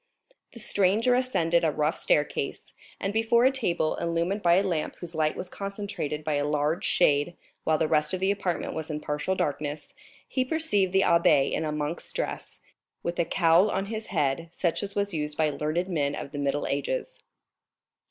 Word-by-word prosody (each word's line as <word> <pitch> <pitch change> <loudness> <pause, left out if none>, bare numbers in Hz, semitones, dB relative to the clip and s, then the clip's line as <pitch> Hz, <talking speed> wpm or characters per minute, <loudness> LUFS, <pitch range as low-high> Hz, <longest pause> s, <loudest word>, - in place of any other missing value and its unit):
The 235 - -10
stranger 210 +4 +2
ascended 175 -10 +2
a 160 - +3
rough 150 +1 0
staircase, - - -1 0.3
and 195 0 -2
before 225 +2 +3
a 260 - +6
table, 175 -12 0
illumined 170 +4 -1
by 170 -2 +5
a 190 - +3
lamp 170 -6 -2
whose 175 -1 -7
light 155 -1 +1
was 185 - -3
concentrated 195 -7 -4
by 150 -1 0
a 145 - 0
large 150 +3 0
shade 145 +4 +3 0.3
while 160 -1 +3
the 160 - +1
rest 150 -1 +2
of 185 - -1
the 190 +1 +2
apartment 195 -4 -2
was 160 0 -5
in 150 -1 -3
partial 150 +5 -2
darkness, 145 -1 -3 0.3
he 260 - 0
perceived 255 - +1
the 190 0 +4
abbé 160 -6 +4
in 160 - -1
a 155 - -1
monk's 150 +2 -3
dress, - - -4 0.4
with 170 +1 -3
a 170 - +3
cowl 170 +4 +4
on 195 - -1
his 220 0 -5
head 165 -1 -1
such 170 -1 -1
as 200 0 -5
was 200 -1 0
used 150 -1 -2
by 155 -1 +2
learned 155 +5 -1
men 145 -6 0
of 140 - -6
the 145 - -5
Middle 140 +1 0
Ages. - - -2
170 Hz, 190 wpm, -27 LUFS, 150-200 Hz, 0.4 s, a